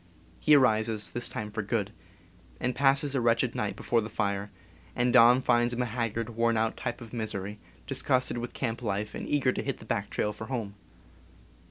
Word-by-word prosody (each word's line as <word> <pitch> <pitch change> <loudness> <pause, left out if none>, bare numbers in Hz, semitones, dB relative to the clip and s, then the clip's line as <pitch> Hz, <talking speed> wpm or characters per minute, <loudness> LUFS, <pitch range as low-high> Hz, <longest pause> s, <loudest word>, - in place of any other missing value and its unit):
He 150 - +5
arises, 110 -6 +2
this 120 +5 -1
time 105 0 -5
for 110 +1 -2
good, 105 -1 -1 0.8
passes 140 +2 +2
a 135 - +1
wretched 115 -1 +2
night - - -2
before 115 -1 +1
the 105 - -5
fire, 100 -1 -2 0.5
and 120 0 +1
dawn 125 +1 +7
finds 120 -1 +2
him 125 - -1
a - - -1
haggard, 115 -1 -2
worn 115 0 +1
out 110 0 0
type 120 0 -4
of 115 -1 -11
misery, 105 -3 -4 0.3
disgusted 130 -2 +1
with 120 +1 -5
camp 115 -3 -3
life 105 -2 -2
and - - -6
eager 140 -3 +2
to - - -3
hit - - -3
the - - -13
back - - -2
trail 105 - -1
for 110 +2 -8
home. 115 -6 -3
115 Hz, 190 wpm, -28 LUFS, 105-125 Hz, 0.8 s, dawn